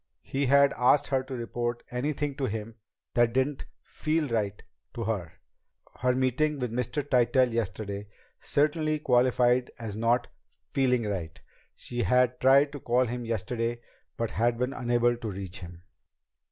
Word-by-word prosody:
He 135 0 -1
had 140 +1 +5
asked 125 +3 +3
her 135 -1 +2
to 130 - -6
report 120 0 -3
anything 145 +3 -2
to 135 - -1
him 110 0 -4 0.4
that 120 -1 +3
didn't 130 +2 0 0.2
"feel" 155 0 -1
right 105 -3 -1 0.4
to 115 - -3
her. 100 -6 -3 0.7
Her 125 0 +2
meeting 130 +4 +1
with 125 -4 -3
Mr. 125 +4 -2
Tytell 125 -1 +3
yesterday 100 -2 -3 0.3
certainly 155 +1 +1
qualified 125 -2 +3
as 110 -4 -6
not 115 +3 +1 0.4
"feeling 125 -3 +1
right." 85 -5 -4 0.4
She 120 0 -4
had 125 0 +2
tried 140 +2 +5
to 145 - -7
call 125 +1 +2
him 120 0 -4
yesterday 115 +1 -2 0.4
but 115 -1 -2
had 120 +1 +1
been 125 +2 -1
unable 120 -2 +1
to 115 -2 -5
reach 95 -1 -6
him. 85 -1 -11
120 Hz, 150 wpm, -28 LUFS, 115-130 Hz, 0.7 s, had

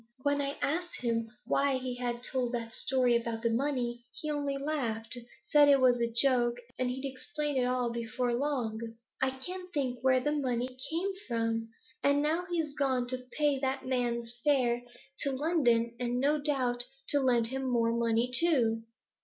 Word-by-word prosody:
When 285 0 +2
I 280 0 -3
asked 350 +5 -2
him 230 -2 0 0.2
why 275 -1 +2
he 255 -1 -4
had 245 -1 -3
told 250 -1 -1
that 230 -1 -3
story 255 -1 +3
about 230 -1 -2
the 230 - +2
money, 240 -1 -1 0.2
he 305 - -2
only 285 -2 -1
laughed 250 -6 -2 0.4
said 295 -1 +7
it 280 -1 +6
was 250 -2 +4
a 235 0 +1
joke, 240 0 +3 0.2
and 255 -1 +1
he'd 260 +2 -4
explain 295 +2 -3
it 255 -1 +2
all 250 -1 0
before 235 +1 -2
long. 240 -4 -1 0.4
I 265 - +3
can't 360 +8 -6
think 260 -6 -1
where 260 0 +4
the 295 +4 0
money 255 -3 -1
came 345 +5 0 0.2
from! 225 -1 -1 0.3
And 285 0 +4
now 325 +4 +1
he's 325 -4 -1
gone 265 -4 +1
to 255 0 -3
pay 295 -3 +2
that 265 0 -1
man's 240 -2 -1
fare 250 -5 +3 0.4
to 275 - 0
London, 250 -6 +2
and 245 0 -1
no 290 +3 +2
doubt 255 -5 0 0.3
to 285 - +4
lend 240 -4 +4
him 265 +1 -3
more 230 -1 +2
money 235 +1 +1
too.' 250 -8 +3
255 Hz, 175 wpm, -31 LUFS, 235-285 Hz, 0.4 s, said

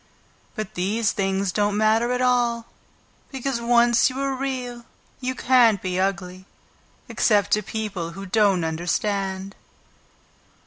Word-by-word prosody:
But 215 -4 -5
these 205 +5 0
things 195 -1 -1
don't 205 +1 0
matter 220 +3 +2
at 250 0 0
all, 240 -2 +1 0.7
because 265 -2 -3
once 235 0 +4
you 260 +1 -6
are 275 0 -1
Real 255 -3 -4 0.4
you 255 0 -3
can't 240 -5 +4
be 185 0 -3
ugly, 185 0 -3 0.6
except 205 -3 +2
to 210 - +3
people 200 -5 -5
who 195 +2 -8
don't 195 -3 +2
understand." 190 +4 -2
215 Hz, 125 wpm, -23 LUFS, 190-240 Hz, 0.7 s, once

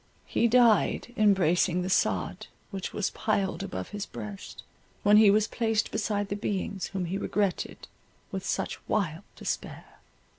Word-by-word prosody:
He 235 - +2
died 240 0 +3
embracing 180 -4 +3
the 185 - -3
sod, - - 0 0.2
which 195 -2 -4
was 205 - -1
piled 205 -3 -1
above 195 -2 -5
his 205 -1 -5
breast, 205 -2 -8 0.4
when 205 +1 +6
he 215 -1 +8
was 210 +1 +4
placed 225 -2 0
beside 205 -2 -1
the 200 - -1
beings 200 -2 -3
whom 190 -2 -3
he 190 +4 -2
regretted 200 -2 -2 0.4
with - - -4
such - - -2
wild 175 -6 0
despair. - - -5
205 Hz, 145 wpm, -28 LUFS, 190-215 Hz, 0.4 s, he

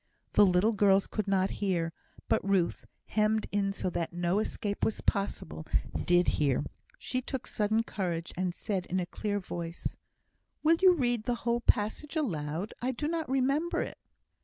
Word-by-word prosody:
The 205 - +7
little 185 +5 +3
girls 195 -1 +4
could 215 -2 -3
not 195 -1 +2
hear; 170 -5 0 0.3
but - - +2
Ruth, 190 -3 +1 0.2
hemmed 215 0 +1
in 200 -1 +1
so 185 -2 -2
that 170 -1 -2
no 175 +3 +1
escape 210 -1 -3
was 220 - +1
possible, 200 -5 -2 0.4
did 175 0 +4
hear. 140 -3 +2 0.3
She 255 - -2
took 265 0 -4
sudden 215 +1 +1
courage, 175 -6 -3
and 185 0 0
said, 185 +1 -3
in 185 - 0
a 180 - -1
clear 205 +3 -2
voice, 170 -2 -5 0.7
"Will 325 +2 +5
you 375 -1 +8
read 240 -6 0
the 245 - +1
whole 235 0 +2
passage 235 +8 +1
aloud? 175 - -2
I 255 +2 0
do 295 +5 -2
not 325 -2 -2
remember 275 +5 +1
it." - - -8
205 Hz, 165 wpm, -30 LUFS, 180-240 Hz, 0.7 s, you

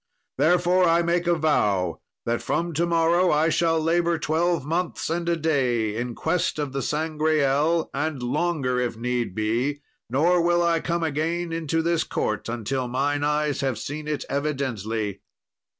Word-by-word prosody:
Therefore, 180 +2 +4
I 170 +1 +3
make 170 +1 0
a 175 - +4
vow, 105 - +1 0.2
that 120 0 -1
from 170 0 -1
to 170 +3 +1
morrow 170 +2 +3
I 155 +1 +3
shall 165 0 +2
labour 170 +1 +1
twelve 160 +1 0
months 165 +1 -2
and 170 +1 -1
a 170 - +2
day 125 -9 0
in 120 +1 -3
quest 160 0 0
of 145 -3 -3
the 135 - -2
Sangreal, 155 0 +1
and 145 -2 -2
longer 135 -1 0
if 120 -2 -2
need 120 -4 -2
be; 120 +7 -1 0.3
nor 170 +8 +3
will 175 0 +2
I 170 -1 +2
come 170 +1 -2
again 165 +3 -1
into 165 0 -1
this 170 0 +1
court 105 +1 -2
until 120 +3 -2
mine 145 +4 0
eyes 150 -1 0
have 135 -3 -1
seen 150 +1 -6
it 150 -1 -2
evidently." 115 -8 -2
150 Hz, 160 wpm, -24 LUFS, 130-170 Hz, 0.3 s, Therefore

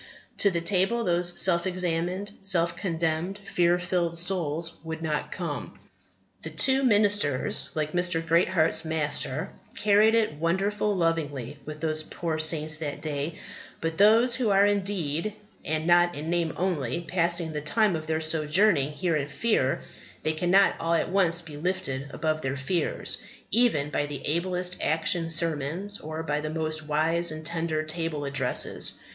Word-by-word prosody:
to 200 - +5
the 170 -3 -1
table 195 +6 +1
those 175 -2 +3
self 170 -1 +5
examined, 180 +2 -2
self 180 -4 +4
condemned, 165 +1 -2
fear 175 -3 +1
filled 175 -1 -1
souls 170 -2 -1
would 160 0 -5
not 155 -2 -2
come. - - -5 0.6
The - - -6
two 265 0 +3
ministers, 205 - +1
like 155 -1 -1
Mr. 175 -2 +1
Greatheart's 165 -1 +2
Master, 150 -2 -2 0.2
carried 210 +2 +4
it 220 -8 +1
wonderful 195 +6 0
lovingly 145 -6 -2
with 150 0 -7
those 155 -1 +1
poor 160 0 -4
saints 155 -1 +2
that 150 -3 -4
day; 155 +1 -3 0.4
but 165 +1 -3
those 225 +4 +5
who 245 -3 0
are 200 0 +5
in 205 -1 +2
deed, 190 0 -3 0.3
and 155 0 -2
not 175 0 +4
in 155 +3 -4
name 170 -2 0
only, 170 -5 -1
passing 170 -1 0
the 150 - -3
time 205 +5 +1
of 155 -1 -6
their 160 0 -1
sojourning 155 0 +3
here 170 +1 -1
in 145 -2 -1
fear 140 - 0 0.4
they 155 - +1
cannot 180 +5 +3
all 165 +1 0
at 165 - 0
once 175 -3 +2
be 155 -3 -10
lifted 150 -5 -3
above 155 +2 -1
all - - -12
their 135 0 -3
fears, 165 +6 -1 0.3
even 155 -12 +2
by 145 +1 -1
the 145 -2 -7
ablest 180 +3 -1
action 165 +1 +1
sermons, 165 +5 0
or 155 +1 -6
by 150 -1 -2
the 155 - -4
most 155 -1 -2
wise 165 +3 +1
and 155 0 -7
tender 165 -1 -2
table 155 -2 -3
addresses. 135 -3 -1
165 Hz, 160 wpm, -26 LUFS, 155-185 Hz, 0.6 s, to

